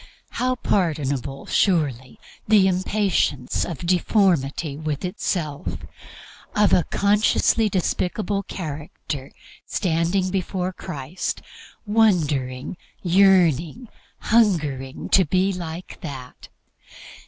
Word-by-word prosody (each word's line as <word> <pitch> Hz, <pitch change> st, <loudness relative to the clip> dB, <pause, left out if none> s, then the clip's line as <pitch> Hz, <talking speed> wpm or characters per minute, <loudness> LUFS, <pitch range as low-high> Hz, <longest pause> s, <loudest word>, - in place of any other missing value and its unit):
How 255 Hz, 0 st, 0 dB
pardonable, 145 Hz, -, -1 dB
surely, 140 Hz, -, 0 dB, 0.3 s
the 205 Hz, -3 st, +5 dB
impatience 185 Hz, -8 st, 0 dB
of 170 Hz, -1 st, -5 dB
deformity 170 Hz, -5 st, +1 dB
with 155 Hz, +1 st, -3 dB
itself, 150 Hz, -, -3 dB, 0.8 s
of 210 Hz, -1 st, +4 dB
a 175 Hz, -, +4 dB
consciously 210 Hz, +2 st, +2 dB
despicable 195 Hz, +2 st, -1 dB
character 150 Hz, -5 st, -6 dB, 0.4 s
standing 180 Hz, +1 st, 0 dB
before 185 Hz, -1 st, -2 dB
Christ, 170 Hz, 0 st, -5 dB, 0.4 s
wondering, 160 Hz, -, +1 dB, 0.3 s
yearning, 180 Hz, -, +3 dB, 0.3 s
hungering 150 Hz, -, +1 dB
to 190 Hz, -, +5 dB
be 185 Hz, +4 st, +1 dB
like 175 Hz, 0 st, -7 dB
that! 130 Hz, -5 st, -9 dB
175 Hz, 85 wpm, -23 LUFS, 145-195 Hz, 0.8 s, the